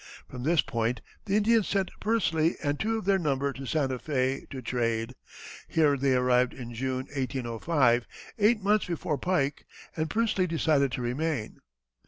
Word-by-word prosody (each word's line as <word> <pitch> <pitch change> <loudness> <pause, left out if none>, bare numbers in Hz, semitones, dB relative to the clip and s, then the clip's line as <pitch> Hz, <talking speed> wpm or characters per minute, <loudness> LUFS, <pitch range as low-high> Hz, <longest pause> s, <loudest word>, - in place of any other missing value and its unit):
From 125 - -8
this 160 +4 +3
point 115 +1 -1 0.3
the 195 - 0
Indians 220 0 +3
sent 195 -2 0
Pursley 170 -7 +1
and 145 0 -1
two 225 +1 0
of 220 - -5
their 195 -1 +3
number 140 -3 0
to 135 +1 -8
Santa 130 -2 0
Fé 135 -2 -1
to 135 - -6
trade. 115 -1 -1 0.5
Here 150 -3 +3
they 135 -1 +2
arrived 125 0 +2
in 120 -2 -8
June, 130 +2 -2
1805, 125 0 +1 0.3
eight 210 0 +3
months 210 +1 +2
before 160 -4 -2
Pike, 150 -6 -1 0.3
and 160 -1 -1
Pursley 215 -5 +1
decided 155 -5 +2
to 125 - -3
remain. 130 -1 -2
140 Hz, 160 wpm, -28 LUFS, 125-175 Hz, 0.5 s, this